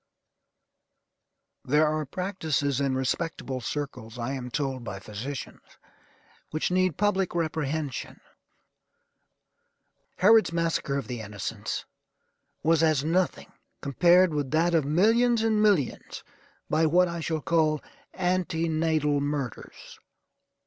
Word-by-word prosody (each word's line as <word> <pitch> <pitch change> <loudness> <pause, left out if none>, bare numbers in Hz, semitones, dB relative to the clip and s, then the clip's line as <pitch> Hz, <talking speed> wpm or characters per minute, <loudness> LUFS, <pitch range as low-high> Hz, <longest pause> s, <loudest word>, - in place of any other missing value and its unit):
There 150 +4 +3
are 155 -1 -1
practices 155 -6 -1
in 135 -1 +1
respectable 130 -1 -2
circles, 125 -3 -5
I 120 +2 -3
am 125 -2 -5
told 135 -1 -2
by 100 -4 -6
physicians, 120 +6 -7 0.9
which 155 +3 -1
need 185 -3 +1
public 195 -3 +1
reprehension. 155 -4 -2 2.0
Herod's 215 +1 +5
massacre 165 -4 0
of 140 - -3
the 120 -3 -5
innocents 105 0 -5 0.8
was 165 0 +3
as 155 -4 +3
nothing 175 +2 0 0.3
compared 175 +5 +4
with 145 -3 -1
that 165 +4 +2
of 160 -4 +3
millions 225 - +3
and 220 -1 +2
millions 200 -11 +1 0.4
by 160 +1 +2
what 180 +3 +4
I 170 0 -4
shall 160 -1 -2
call 155 -1 +2 0.4
ante 180 -3 0
natal 155 -2 +1
murders. 140 -5 -5
155 Hz, 110 wpm, -27 LUFS, 135-175 Hz, 2.0 s, Herod's